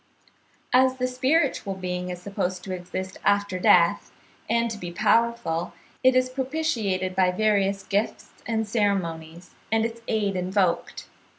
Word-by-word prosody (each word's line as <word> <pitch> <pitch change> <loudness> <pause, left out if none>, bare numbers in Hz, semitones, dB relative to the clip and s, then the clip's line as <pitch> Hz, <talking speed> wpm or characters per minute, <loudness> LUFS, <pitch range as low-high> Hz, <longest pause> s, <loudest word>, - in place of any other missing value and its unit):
As 260 0 +5
the 255 -1 -1
spiritual 255 -4 +1
being 180 -1 -4
is 180 -1 -5
supposed 185 -1 -3
to 190 - -5
exist 185 +1 -6
after 200 -2 +1
death 170 -1 +4 0.4
and 235 0 +2
to 215 - -6
be 175 -2 -6
powerful, 215 -4 +1 0.3
it 260 0 +5
is 255 0 +3
propitiated 255 - -2
by 185 -1 +4
various 200 0 +1
gifts 205 +2 -2 0.2
and 220 -1 -1
ceremonies, 175 -6 -2 0.2
and 225 0 +2
its 230 0 -5
aid 205 -3 0
invoked. 185 0 -1
200 Hz, 135 wpm, -25 LUFS, 185-235 Hz, 0.4 s, As